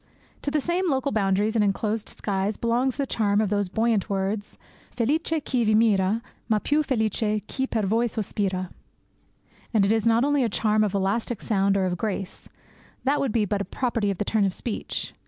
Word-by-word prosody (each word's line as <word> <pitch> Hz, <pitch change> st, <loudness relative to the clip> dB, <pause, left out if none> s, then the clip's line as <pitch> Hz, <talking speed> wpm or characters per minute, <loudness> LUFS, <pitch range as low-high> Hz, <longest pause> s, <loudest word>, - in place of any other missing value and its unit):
To -, -, -2 dB
the 300 Hz, +1 st, +1 dB
same 345 Hz, +4 st, 0 dB
local 270 Hz, -1 st, 0 dB
boundaries 205 Hz, +1 st, +1 dB
and 220 Hz, -, +4 dB
enclosed 210 Hz, +2 st, -1 dB
skies 200 Hz, +1 st, -2 dB
belongs 240 Hz, +2 st, 0 dB
the 280 Hz, -, 0 dB
charm 205 Hz, -5 st, +1 dB
of 210 Hz, -2 st, +1 dB
those 205 Hz, -2 st, 0 dB
buoyant 220 Hz, 0 st, +1 dB
words: 200 Hz, +1 st, -2 dB, 0.3 s
Felice 270 Hz, +7 st, 0 dB
chi 280 Hz, -6 st, 0 dB
vi 215 Hz, -1 st, +3 dB
mira, 215 Hz, 0 st, +3 dB, 0.3 s
Ma 215 Hz, -, +4 dB
piu 295 Hz, +8 st, +1 dB
felice 220 Hz, -5 st, 0 dB
chi 265 Hz, 0 st, -2 dB
per 220 Hz, -4 st, -1 dB
voi 225 Hz, +5 st, +2 dB
sospira! 195 Hz, -4 st, -2 dB, 1.0 s
And 205 Hz, -3 st, +5 dB
it 200 Hz, -, +2 dB
is 225 Hz, 0 st, +2 dB
not 230 Hz, +1 st, +4 dB
only 290 Hz, -1 st, +2 dB
a 235 Hz, -, +1 dB
charm 215 Hz, +1 st, +2 dB
of 205 Hz, -1 st, -1 dB
elastic 200 Hz, +3 st, 0 dB
sound 200 Hz, -2 st, +1 dB
or 190 Hz, -, +1 dB
of 180 Hz, -1 st, -2 dB
grace; 195 Hz, -3 st, -4 dB, 0.5 s
that 280 Hz, +2 st, +2 dB
would 270 Hz, -4 st, 0 dB
be 215 Hz, -1 st, +2 dB
but 200 Hz, 0 st, -1 dB
a -, -, 0 dB
property 230 Hz, -3 st, -1 dB
of 195 Hz, -, -2 dB
the 210 Hz, -, -2 dB
turn 215 Hz, 0 st, +1 dB
of 195 Hz, -2 st, 0 dB
speech. 230 Hz, -, -4 dB
215 Hz, 195 wpm, -25 LUFS, 200-235 Hz, 1.0 s, And